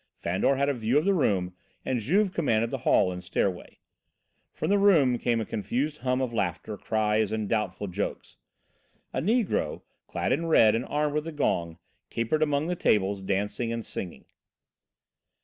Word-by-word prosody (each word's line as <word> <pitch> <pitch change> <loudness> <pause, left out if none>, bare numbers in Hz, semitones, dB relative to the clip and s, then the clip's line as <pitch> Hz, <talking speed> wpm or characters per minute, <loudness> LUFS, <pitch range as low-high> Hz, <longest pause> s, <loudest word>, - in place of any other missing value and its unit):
Fandor 95 +10 +1
had 140 +1 +1
a 145 - +2
view 120 +2 0
of 150 - +2
the 200 - +3
room 95 - +1 0.3
and 125 - 0
Juve 190 - +1
commanded 115 -9 +1
the - - -3
hall 90 - +3
and 90 0 -7
stairway. 95 -3 -2 0.7
From 155 - -3
the 205 - +4
room 150 -12 +4
came 120 -2 +1
a 110 - -2
confused 140 +9 -2
hum 130 0 0
of 125 -2 -2
laughter, 100 0 -2
cries 110 0 0
and 110 -1 -2
doubtful 105 -1 -1
jokes. 100 +1 -5 0.8
A - - -1
negro, 225 +2 0 0.2
clad - - -2
in 165 +6 0
red 110 -9 +5
and 115 +2 -1
armed 150 0 0
with 150 +1 -2
a - - -4
gong, 85 - -1 0.3
capered 115 +7 -1
among 145 -1 +1
the 180 +2 -1
tables, 100 - +1
dancing 105 +4 -1
and 115 -1 -4
singing. 90 -3 -6
115 Hz, 170 wpm, -27 LUFS, 105-150 Hz, 0.8 s, red